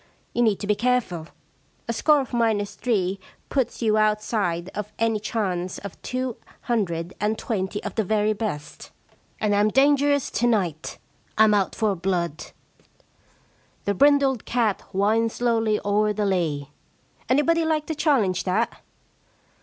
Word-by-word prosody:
You 240 - +1
need 215 -4 +2
to - - -3
be 210 - +3
careful. 210 -8 0 0.6
A 230 - -1
score 295 +5 +4
of 260 - -8
minus 215 -4 +1
three 200 -5 -1 0.3
puts 265 -3 -1
you 215 -1 +3
outside 210 -5 0
of 210 +1 -6
any 225 -1 +1
chance 190 -5 -2
of 200 -2 -9
two 255 -2 -3 0.2
hundred 180 -7 -1
and 215 +1 0
twenty 205 -3 -3
of 205 - -4
the 220 - 0
very 215 +1 +1
best. 200 -9 -5 0.5
And 210 -1 +1
Tm 205 +1 +3
dangerous 285 +1 +3
to 240 - +1
night 180 -10 -1 0.2
— - - -37
Fm 215 0 +6
out 195 -2 0
for 215 -3 +1
blood. 170 -3 -2 1.4
The 200 - +1
brindled 275 +1 +3
cat 230 -5 0
winds 220 +4 +1
slowly 225 -3 +1
o*er 210 +1 +2
the 210 0 -1
lea— 155 -7 -1 0.6
anybody 325 +5 +3
like 315 -1 0
to 320 - -3
challenge 255 - +1
that 220 +5 -1
215 Hz, 145 wpm, -24 LUFS, 195-240 Hz, 1.4 s, Fm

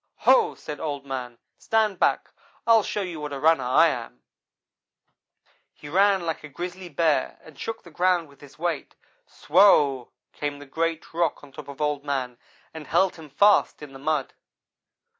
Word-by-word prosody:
"'Ho!' 475 -3 +4
said 150 -2 -8
Old 145 -3 -4
man, 125 -3 -6 0.2
'stand 215 -4 0
back! - - +1 0.3
I'll 230 -1 +6
show 205 0 -3
you 175 -4 -6
what 150 -1 -5
a 140 - -4
runner 155 -2 +3
I 160 +7 +5
am.' 115 - -7 1.5
"He 145 - -11
ran 195 +1 +3
like 165 -2 -3
a 150 - -9
grizzly 180 +4 -7
bear, 150 -3 0
and 160 - -15
shook 225 0 -5
the 170 - -14
ground 175 0 +1
with 140 -1 -21
his 145 -1 -15
weight. 170 -2 -3 0.3
Swow! 145 -7 +3 0.2
came 145 -1 -4
the 145 - -11
great 165 +4 -3
rock 165 -3 -1
on 145 - -14
top 150 +1 -10
of 140 -1 -10
Old 150 -1 -1
man 130 -4 -3 0.3
and 160 -2 -9
held 190 -2 +2
him 160 -2 -12
fast 200 +1 +3
in 140 -2 -10
the 135 - -11
mud. 150 -1 -1
155 Hz, 175 wpm, -25 LUFS, 140-175 Hz, 1.5 s, I'll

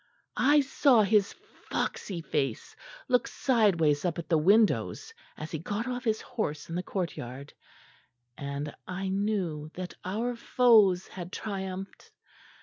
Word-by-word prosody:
"I 290 +2 +5
saw 270 -4 +4
his 205 0 +3 0.4
foxy 180 -4 -2
face 135 -6 -2 0.3
look 250 0 +2
sideways 185 - +2
up 175 -3 -1
at 170 - -6
the 165 - +4
windows 215 - +2 0.2
as 155 - -7
he 160 - -3
got 205 - -3
off 250 -1 -4
his 220 -1 +1
horse 160 -13 -4
in 165 - -4
the 180 - 0
courtyard; 145 -8 -5 0.8
and 140 +1 -5
I 190 +1 -3
knew 190 -7 -1
that 180 0 -6
our 225 +6 -2
foes 220 -6 +4
had 175 -1 -8
triumphed. 190 -2 -6
190 Hz, 135 wpm, -29 LUFS, 165-225 Hz, 0.8 s, I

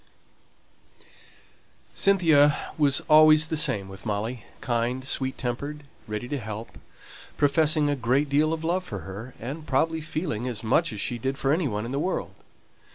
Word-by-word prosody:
Cynthia 160 -7 +4 0.2
was 145 -3 +2
always 155 0 +6
the - - -1
same 130 -11 +1
with 95 0 -11
Molly: 110 +2 -3
kind, 120 +2 -1
sweet 130 0 -1
tempered, 140 +4 -4 0.2
ready 105 +2 -4
to 145 +1 -3
help, 110 0 -8 0.6
professing 150 +1 +3
a 145 - +1
great 130 +3 +1
deal 150 +3 +2
of 165 0 -3
love 175 +3 0
for 100 - -6
her, 100 +9 -9
and 145 +7 -7
probably 160 +4 +1
feeling 155 -6 -3
as 115 -3 -4
much 110 - +2
as 110 - -6
she 120 +4 -2
did 135 +3 -2
for 135 +1 +1
any 160 -1 +1
one 105 -2 -3
in 120 - -5
the 140 - -1
world. 185 +5 -2
135 Hz, 160 wpm, -26 LUFS, 115-155 Hz, 0.6 s, always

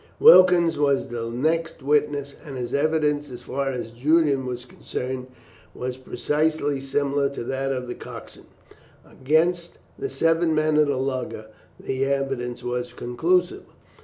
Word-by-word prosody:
Wilkens 180 - +7
was 140 -2 +2
the 115 -1 -4
next 160 +5 -1
witness, 145 -1 +1
and 140 -5 -7
his 120 -1 -4
evidence, 150 0 +1
as 125 -1 -9
far 135 +2 -2
as 125 -3 -4
Julian 140 +1 +2
was 125 0 -5
concerned, 125 +1 -5 0.5
was 125 0 -4
precisely 145 +2 -1
similar 140 +1 0
to 140 - -6
that 135 +2 -2
of 125 -2 -3
the 120 - -4
coxswain. - - -11 0.6
Against 170 +5 0 0.2
the 410 - -3
seven 165 - +2
men 155 0 +2
of 150 -1 +4
the 140 -2 0
lugger 130 -4 -3 0.3
the 130 0 -2
evidence 135 -3 -2
was 125 0 -3
conclusive. 170 +10 0
140 Hz, 140 wpm, -24 LUFS, 125-155 Hz, 0.6 s, Wilkens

